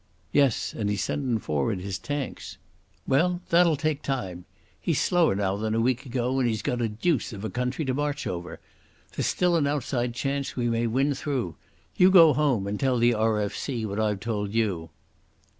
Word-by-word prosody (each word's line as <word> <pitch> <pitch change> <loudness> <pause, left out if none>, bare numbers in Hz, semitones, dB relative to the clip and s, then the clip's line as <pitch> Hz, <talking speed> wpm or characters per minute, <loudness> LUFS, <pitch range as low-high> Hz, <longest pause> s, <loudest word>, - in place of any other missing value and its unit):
"Yes, 140 -5 +2
and 105 -2 -2
he's 105 -1 -1
sendin' 130 -5 -1
forward 75 -1 -1
his 95 +1 -4
tanks." 145 -2 -5 0.5
"Well, 175 +6 +2
that'll 170 -1 +5
take 155 0 -1
time. 95 -10 -4 0.3
He's - - 0
slower 175 - +3
now 100 -1 0
than 110 +1 -1
a - - +1
week 130 +3 0
ago 125 +1 -1
and 125 -2 +2
he's 110 -3 -2
got 125 -1 -1
a 115 - 0
deuce 125 +4 -1
of 100 +1 -6
a - - -4
country 125 +5 -2
to 130 - 0
march 145 +1 -2
over. 85 -1 -5 0.6
There's - - 0
still 180 -1 +2
an 145 -3 +1
outside 125 -4 -1
chance 140 +1 -2
we 120 -2 0
may 115 0 +1
win 135 +5 +1
through. 130 - -3 0.4
You 180 - +7
go 165 -5 +8
home 135 -10 +1
and 100 +1 -3
tell 130 -2 +2
the 120 +1 +4
R.F.C. 110 +2 -1
what 100 0 -3
I've 105 -3 0
told 105 -2 -3
you." 95 -8 0
120 Hz, 190 wpm, -26 LUFS, 105-140 Hz, 0.6 s, go